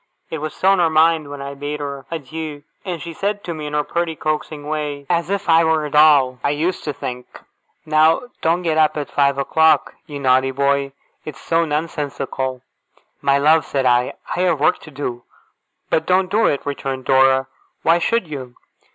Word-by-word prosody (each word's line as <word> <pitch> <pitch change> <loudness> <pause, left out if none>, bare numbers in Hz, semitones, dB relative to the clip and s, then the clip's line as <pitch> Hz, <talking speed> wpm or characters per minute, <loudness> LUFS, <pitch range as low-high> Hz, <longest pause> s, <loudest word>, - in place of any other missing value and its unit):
It 160 - -3
was 155 +1 -5
still 190 - +3
on 195 - +3
her 170 -2 +3
mind 160 -1 +3
when 145 -1 -7
I 140 0 -6
bade 145 +1 -5
her 140 -2 -6
adieu; 155 -1 -6 0.2
and 180 -4 -4
she 170 +2 -7
said 205 +4 -2
to 170 - -4
me, 155 -2 -6
in 150 - -7
her 150 0 +1
pretty 170 0 -2
coaxing 155 -1 -3
way 150 -2 -3
as 170 0 0
if 200 0 -2
I 165 0 +5
were 160 -1 +1
a 150 - -6
doll, 145 -4 +5
I - - +2
used 160 +6 -1
to 150 - -1
think: 125 -3 -6 0.6
'Now 155 +3 +3 0.2
don't 170 +2 +1
get 160 -2 +1
up 155 0 +3
at 145 - -4
five 140 -1 +2
o'clock, 160 +3 +3
you 145 -3 -7
naughty 130 0 +3
boy. 140 0 0 0.3
It's 150 -3 -8
so 165 0 +1
nonsensical!' 140 -4 -3 0.6
'My 140 0 +3
love,' 155 +2 +4
said 135 -2 -1
I, 125 0 +2 0.2
'I - - -3
have 175 -5 +2
work 150 - +2
to - - -13
do.' 130 -4 -5 0.7
'But 160 - +1
don't 185 0 +2
do 220 +2 +3
it!' 140 - -1
returned 135 -2 -4
Dora. 130 0 +4 0.4
'Why 165 +1 +4
should 230 +1 0
you? 130 -5 -7
150 Hz, 195 wpm, -20 LUFS, 140-165 Hz, 0.7 s, I